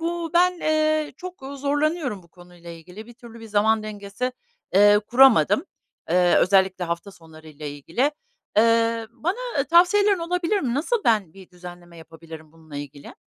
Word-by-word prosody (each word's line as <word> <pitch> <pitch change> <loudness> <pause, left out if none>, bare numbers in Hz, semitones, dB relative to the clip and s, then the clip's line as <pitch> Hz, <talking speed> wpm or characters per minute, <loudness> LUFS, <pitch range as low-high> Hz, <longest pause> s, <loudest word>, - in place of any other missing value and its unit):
bu 335 0 -3
ben, 360 +1 +4
eee, 310 -1 0
çok 360 -5 -10
zorlanıyorum 290 - -2
bu 170 - -23
konuyla 175 -1 -15
ilgili. 180 +6 -12
Bir 240 - -14
türlü 230 -1 -14
bir 225 - -10
zaman 215 +1 +1
dengesi, 210 +4 -5 0.4
eee, 205 +1 +6
kuramadım. 240 - +4 0.5
Eee, 180 -1 +3
özellikle 190 -1 +2
hafta 170 +4 -5
sonları 160 -3 -16
ile 150 -1 -8
ilgili. 165 - -2 0.5
Eee, 230 0 +2
bana 355 - -3
ı - - 0
tavsiyelerin 370 +5 +4
olabilir 355 +3 -1
mi? 245 -3 -2
Nasıl 420 - -1
ben 210 -8 +1
bir 190 0 -16
düzenleme 175 -1 -13
yapabilirim 160 -1 -13
bununla 160 -3 -13
ilgili? 145 0 -9
215 Hz, 155 wpm, -23 LUFS, -, 0.5 s, eee